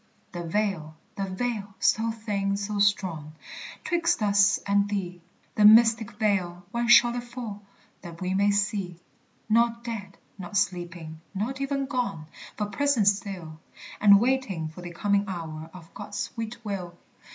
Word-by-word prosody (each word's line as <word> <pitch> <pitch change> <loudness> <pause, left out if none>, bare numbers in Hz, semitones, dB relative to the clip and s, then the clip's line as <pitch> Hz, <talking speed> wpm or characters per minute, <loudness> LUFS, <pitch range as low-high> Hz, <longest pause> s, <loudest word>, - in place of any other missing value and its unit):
The 175 - -5
veil! 170 -4 -2 0.2
the 195 - -2
veil! 200 0 -3
so 225 +1 +2
thin, 205 -3 -2
so 205 +1 -3
strong! 180 -7 0 0.5
'Twixt 340 -8 +1
us 200 0 +4
and 200 0 +2
thee; 180 -4 -3 0.3
The 210 - +2
mystic 225 0 +6
veil! 185 -5 -1
when 235 0 -1
shall 240 0 +7
it 245 - -3
fall, 240 -4 -7 0.4
That 170 -2 -10
we 185 0 -2
may 200 +2 +3
see? 200 -3 0 0.5
Not 235 +1 +2
dead, 210 -5 -6 0.2
not 190 +3 -4
sleeping, 175 -4 -2
not 250 +7 -3
even 275 0 -1
gone, 240 - -2 0.3
But 210 -1 -3
present 275 -8 +3
still, 190 -6 -4 0.4
And 200 -1 +7
waiting 230 -10 0
for 165 +3 -11
the 175 - -7
coming 200 +3 +1
hour 160 -3 -6
Of 170 -2 -14
God's 205 0 -7
sweet 230 +1 -5
will. 180 -4 -5
200 Hz, 150 wpm, -26 LUFS, 180-225 Hz, 0.5 s, shall